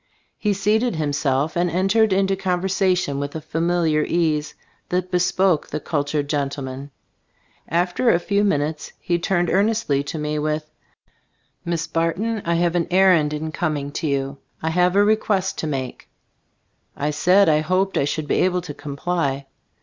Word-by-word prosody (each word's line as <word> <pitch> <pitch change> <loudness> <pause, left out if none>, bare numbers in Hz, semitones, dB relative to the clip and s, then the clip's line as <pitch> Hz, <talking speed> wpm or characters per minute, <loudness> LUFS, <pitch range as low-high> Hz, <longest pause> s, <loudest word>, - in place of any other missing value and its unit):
He 210 - +1
seated 210 +3 +1
himself 145 -1 0
and 175 +1 +1
entered 195 +5 +2
into 195 0 +2
conversation 185 -4 0
with 140 +1 -4
a - - -2
familiar 165 0 +1
ease 155 -3 0 0.3
that 180 +1 -1
bespoke 180 -1 +2
the - - -4
cultured 145 -1 -2
gentleman. 140 -1 -3 0.8
After 180 +8 +1
a 170 - +5
few 200 +3 0
minutes 150 -5 -1
he 175 -1 -1
turned 175 -1 0
earnestly 200 -7 +1
to 150 - -5
me 150 0 -2
with: 155 0 -2 0.9
"Miss 170 -1 -2
Barton, 170 +7 -1
I 170 0 +1
have 170 0 +1
an 175 -2 0
errand 180 -5 +4
in 155 +1 -4
coming 150 -4 -2
to 155 - -3
you. 140 0 -1 0.2
I 160 - -2
have 180 +2 +2
a 200 - +5
request 205 -2 +1
to 160 - -2
make." 135 -4 -5 0.9
I 150 +1 -1
said 180 +6 +4
I 155 -1 +4
hoped 185 +5 0
I - - +2
should 150 +1 -3
be - - +1
able 180 0 +1
to 165 -4 -7
comply. 140 -1 -2
170 Hz, 155 wpm, -22 LUFS, 150-185 Hz, 0.9 s, a